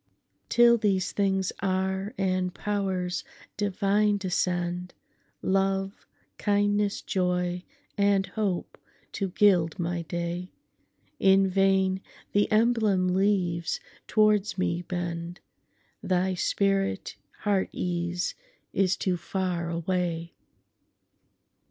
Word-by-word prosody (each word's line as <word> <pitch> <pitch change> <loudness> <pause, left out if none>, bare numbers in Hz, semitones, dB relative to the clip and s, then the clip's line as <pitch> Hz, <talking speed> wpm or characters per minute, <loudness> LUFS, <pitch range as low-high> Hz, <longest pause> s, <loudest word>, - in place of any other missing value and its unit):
Till 235 -1 +6
these 195 -3 +1
things 195 -2 +1
are, 190 +1 -1
and 185 -2 0
pow'rs 190 -3 -2 0.3
divine 205 +1 +2
descend,—Love, 185 +1 -2 0.3
kindness, 205 0 +1
joy, 180 -1 0 0.4
and 200 -1 +3
hope 195 -2 -3 0.3
to 195 -2 -2
gild 180 -4 +3
my 175 -1 -2
day,—In 180 +3 -1
vain 190 0 +2 0.3
the 205 +2 +2
emblem 215 -4 +3
leaves 180 -3 +1 0.3
towards 215 -2 +3
me 175 -2 0
bend; 175 -1 -4 0.6
Thy 185 0 +1
spirit, 195 - 0 0.3
Heart 200 -2 +1
Ease, 175 0 -2 0.4
is 190 -1 +2
too 185 -2 0
far 175 -1 -2
away! 170 0 -2
190 Hz, 85 wpm, -27 LUFS, 180-200 Hz, 0.6 s, Till